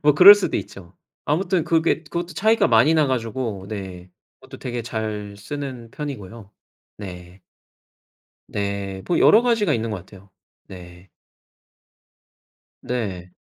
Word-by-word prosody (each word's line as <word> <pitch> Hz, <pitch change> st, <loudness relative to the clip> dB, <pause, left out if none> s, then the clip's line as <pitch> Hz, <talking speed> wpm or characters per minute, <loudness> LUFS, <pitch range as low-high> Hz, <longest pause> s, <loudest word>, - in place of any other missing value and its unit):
뭐 150 Hz, -1 st, +4 dB
그럴 190 Hz, +7 st, +11 dB
수도 205 Hz, -, -2 dB
있죠. 90 Hz, -1 st, -9 dB, 0.3 s
아무튼 175 Hz, +2 st, 0 dB
그게 165 Hz, 0 st, +1 dB
그것도 170 Hz, +2 st, -4 dB
차이가 220 Hz, +7 st, +3 dB
많이 120 Hz, +7 st, +5 dB
나가지고 120 Hz, -8 st, -1 dB
네, 95 Hz, -4 st, -7 dB, 0.3 s
그것도 -, -, -12 dB
되게 120 Hz, -1 st, -4 dB
잘 110 Hz, -3 st, -5 dB
쓰는 130 Hz, 0 st, -7 dB
편이고요. 115 Hz, -8 st, -8 dB, 0.5 s
네. 90 Hz, -2 st, -10 dB, 1.1 s
네. 100 Hz, -1 st, -4 dB
뭐 175 Hz, -, +1 dB
여러 220 Hz, -, +6 dB
가지가 225 Hz, -9 st, +2 dB
있는 115 Hz, -2 st, -2 dB
것 105 Hz, -, -3 dB
같아요. 95 Hz, +2 st, -15 dB, 0.4 s
네. 90 Hz, 0 st, -13 dB, 1.7 s
네. 100 Hz, -8 st, -4 dB
115 Hz, 235 characters per minute, -22 LUFS, 95-150 Hz, 1.7 s, 그럴